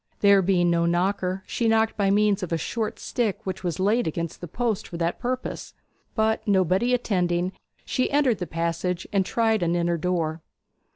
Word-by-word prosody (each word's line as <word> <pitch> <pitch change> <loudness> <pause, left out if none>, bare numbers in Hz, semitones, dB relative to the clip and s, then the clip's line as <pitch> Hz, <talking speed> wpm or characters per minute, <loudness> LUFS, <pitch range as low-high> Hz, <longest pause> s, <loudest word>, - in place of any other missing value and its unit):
There 200 -1 +6
being 175 -2 +2
no 170 0 +2
knocker, 185 +2 0
she 235 - -1
knocked 225 0 +2
by 200 -2 +1
means 205 0 +3
of 180 - -4
a 165 - +1
short 220 +6 -3
stick 225 -5 -2
which 190 -1 -4
was 175 -2 -2
laid 210 +4 +2
against 165 +1 -4
the 175 - -6
post 230 +3 -2
for 170 - -7
that 170 0 -1
purpose; 255 +1 -4 0.4
but 220 0 +1
nobody 190 +4 +2
attending, 180 -6 0 0.3
she 255 - 0
entered 280 -6 +2
the 180 - -3
passage, 170 +2 -2
and 195 -1 +3
tried 220 +1 +1
an 170 0 +1
inner 170 0 +1
door. 165 -2 -1
190 Hz, 180 wpm, -25 LUFS, 175-220 Hz, 0.4 s, There